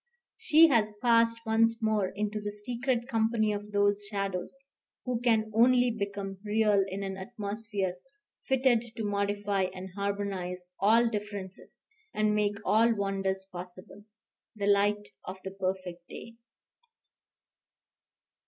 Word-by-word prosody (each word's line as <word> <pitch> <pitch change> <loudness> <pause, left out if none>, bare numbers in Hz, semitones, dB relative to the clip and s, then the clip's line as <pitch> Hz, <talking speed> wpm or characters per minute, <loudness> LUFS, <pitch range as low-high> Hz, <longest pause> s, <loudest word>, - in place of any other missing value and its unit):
She 320 +2 +6
has 215 -5 +2
passed 230 -1 +3
once 225 +1 +3
more 215 -3 +1
into 210 +2 -3
the 205 0 -4
secret 240 +3 -2
company 225 -3 +1
of 205 0 -6
those 205 0 +2
shadows, 195 +2 -3 0.5
who 245 -2 -2
can 220 -3 +2
only 245 +2 +4
become 200 -3 -5
real 210 -1 +3
in 195 +1 -5
an 190 -1 -4
atmosphere 205 -2 -4 0.5
fitted 260 -3 +3
to 225 - -4
modify 200 -1 0
and 185 +1 -7
harmonize 195 -3 -3
all 225 +4 +4
differences, 205 -3 -6 0.3
and 215 0 +2
make 210 -1 +1
all 220 +4 +4
wonders 195 -1 -2
possible, 185 +2 -10 0.5
the 205 -2 -3
light 205 +1 +2
of 185 - -7
the 190 - -5
perfect 185 -2 -4
day. 230 - -9
205 Hz, 125 wpm, -29 LUFS, 195-225 Hz, 0.5 s, She